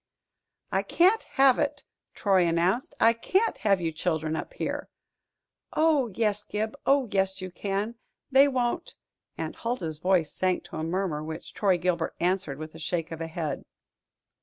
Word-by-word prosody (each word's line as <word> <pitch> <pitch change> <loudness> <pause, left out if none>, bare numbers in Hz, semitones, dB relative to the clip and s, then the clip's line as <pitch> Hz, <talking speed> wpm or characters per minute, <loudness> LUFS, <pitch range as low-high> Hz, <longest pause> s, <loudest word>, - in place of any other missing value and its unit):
"I - - +2
can't 380 +6 +3 0.2
have 270 -2 +6
it," - - -1 0.3
Troy 190 -4 +3
announced. 175 +9 +1
"I 230 +1 +6
can't 380 - +1
have 200 -3 +3
you 165 -2 -1
children 160 -1 -1
up - - -5
here." - - -3 0.8
"Oh, 310 -5 +3
yes, 210 -2 0
Gib 215 +3 -3
oh, 275 -2 +4
yes, 190 -1 +1
you 185 -1 -6
can. 200 +4 -2 0.4
They 270 +2 +7
won't 260 +5 -1 0.2
" - - -51
Aunt - - -4
Huldah's 175 -11 -3
voice 180 -3 +2
sank 185 -1 0
to - - -8
a 155 - -2
murmur, 165 -2 -1
which 160 +1 -7
Troy 195 -3 +2
Gilbert 175 -2 -1
answered 180 -5 0
with 155 +1 -7
a 160 - -11
shake 165 +1 -2
of 165 - -5
the 165 - -3
head. 160 -3 -3
190 Hz, 165 wpm, -27 LUFS, 165-235 Hz, 0.8 s, They